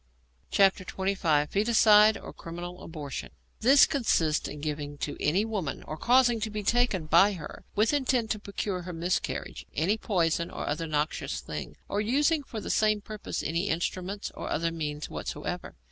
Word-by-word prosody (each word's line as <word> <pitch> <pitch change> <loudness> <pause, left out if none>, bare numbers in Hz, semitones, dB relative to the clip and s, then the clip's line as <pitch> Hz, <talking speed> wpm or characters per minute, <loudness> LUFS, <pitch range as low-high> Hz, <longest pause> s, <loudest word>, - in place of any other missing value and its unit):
XXV. 190 -5 +2
FOETICIDE, 215 +1 +5
OR - - -10
CRIMINAL 175 +2 -8
ABORTION 150 -5 -6 0.3
This 270 +5 +7
consists 165 - +1
in 150 - -7
giving 145 -1 -4
to 145 - -3
any 185 +8 +2
woman, 195 -11 -3
or 155 - -6
causing 240 +5 +4
to 220 0 -2
be 210 0 -4
taken 230 -6 +2
by 195 +6 +5
her, 160 -5 -9
with 215 +6 +3
intent 255 -5 +1
to 215 - -1
procure 200 -2 -3
her 180 0 -7
miscarriage, 170 +2 -2
any 195 +9 +1
poison 170 -5 0
or - - -5
other 160 +3 -2
noxious 150 0 -1
thing, - - -7
or 205 - -1
using 290 +8 +2
for 235 -5 -7
the - - -4
same 215 -1 +3
purpose 215 0 -5
any 170 +5 -1
instruments 185 +4 -2
or - - -6
other 165 +2 0
means 150 -2 -4
whatsoever. - - -5
190 Hz, 160 wpm, -28 LUFS, 160-215 Hz, 0.3 s, This